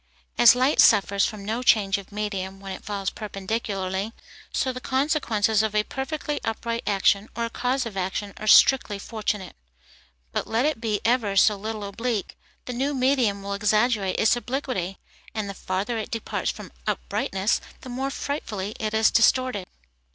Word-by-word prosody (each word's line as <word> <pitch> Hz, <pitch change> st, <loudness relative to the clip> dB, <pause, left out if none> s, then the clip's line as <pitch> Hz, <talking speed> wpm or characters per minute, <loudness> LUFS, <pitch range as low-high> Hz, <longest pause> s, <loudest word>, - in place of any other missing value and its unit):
As 240 Hz, 0 st, +8 dB
light 260 Hz, +4 st, +2 dB
suffers 200 Hz, -2 st, +5 dB
from 205 Hz, -2 st, -7 dB
no 225 Hz, +4 st, -2 dB
change 200 Hz, -5 st, +3 dB
of 200 Hz, -, -13 dB
medium 195 Hz, -2 st, -4 dB
when 195 Hz, 0 st, -7 dB
it 190 Hz, -, -7 dB
falls 200 Hz, -2 st, -3 dB
perpendicularly, 195 Hz, -1 st, -3 dB, 0.4 s
so 260 Hz, -, 0 dB
the 255 Hz, -, -7 dB
consequences 245 Hz, -7 st, +1 dB
of 215 Hz, -1 st, -1 dB
a 210 Hz, -, +3 dB
perfectly 290 Hz, +3 st, -4 dB
upright 230 Hz, +1 st, -2 dB
action, 200 Hz, +1 st, +2 dB
or 235 Hz, 0 st, -1 dB
cause 255 Hz, +2 st, 0 dB
of 225 Hz, -4 st, -6 dB
action, 195 Hz, +2 st, -3 dB
are 215 Hz, -, -6 dB
strictly 215 Hz, -2 st, +6 dB
fortunate. 210 Hz, -2 st, -4 dB, 0.8 s
But -, -, -2 dB
let 230 Hz, +4 st, +1 dB
it 300 Hz, -7 st, 0 dB
be 215 Hz, -3 st, -1 dB
ever 225 Hz, -4 st, +2 dB
so 210 Hz, +2 st, +5 dB
little 215 Hz, +1 st, -5 dB
oblique, 220 Hz, +1 st, -3 dB, 0.3 s
the 250 Hz, -, -4 dB
new 275 Hz, +4 st, -1 dB
medium 250 Hz, -6 st, +2 dB
will 200 Hz, 0 st, -3 dB
exaggerate 210 Hz, -1 st, +1 dB
its 225 Hz, +2 st, +4 dB
obliquity; 240 Hz, -7 st, -3 dB, 0.4 s
and 215 Hz, -2 st, -2 dB
the 200 Hz, -, -5 dB
farther 195 Hz, +5 st, -2 dB
it 215 Hz, -, -5 dB
departs 225 Hz, -2 st, -2 dB
from -, -, -6 dB, 0.2 s
uprightness, 190 Hz, -, 0 dB, 0.2 s
the 255 Hz, -, -9 dB
more 265 Hz, +2 st, -2 dB
frightfully 220 Hz, -8 st, -4 dB
it 215 Hz, 0 st, -2 dB
is 220 Hz, 0 st, +4 dB
distorted. 235 Hz, -4 st, +3 dB
215 Hz, 165 wpm, -25 LUFS, 200-245 Hz, 0.8 s, As